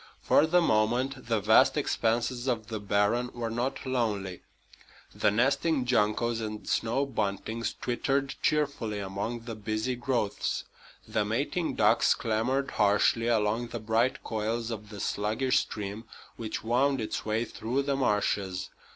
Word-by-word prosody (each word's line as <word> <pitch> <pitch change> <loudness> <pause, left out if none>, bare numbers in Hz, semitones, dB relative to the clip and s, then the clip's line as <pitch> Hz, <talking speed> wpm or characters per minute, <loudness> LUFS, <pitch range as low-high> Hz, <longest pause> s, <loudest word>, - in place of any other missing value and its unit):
For 155 - +4
the 175 +2 +4
moment 125 +2 +1
the 115 -2 +2
vast 100 - +5
expanses 120 +2 0
of 115 -3 -1
the 110 -2 -3
barren 105 +4 +1
were 115 -2 -3
not 125 +5 -2
lonely. 105 -8 -1 0.7
The - - +2
nesting 135 +6 +2
juncos 115 0 +1
and 110 -1 -5
snow 120 +5 +1
buntings 110 -1 -2
twittered 135 +2 0
cheerfully 140 -8 0
among 100 +4 -4
the 115 0 -6
busy 110 +3 -2
growths. 120 -4 -1 0.4
The 110 - 0
mating 140 +10 -1
ducks - - +4
clamored 120 +5 0
harshly 105 +3 +3
along 115 +1 +1
the 115 0 -5
bright 115 +4 +1
coils 110 +2 -2
of 105 -2 -6
the 105 -2 -9
sluggish 110 +7 +1
stream 105 +2 -5 0.3
which 110 -2 -5
wound 130 +4 +2
its 110 - -3
way 110 +2 0
through 120 +5 -2
the 140 0 0
marshes. 100 -6 0
115 Hz, 140 wpm, -29 LUFS, 105-130 Hz, 0.7 s, vast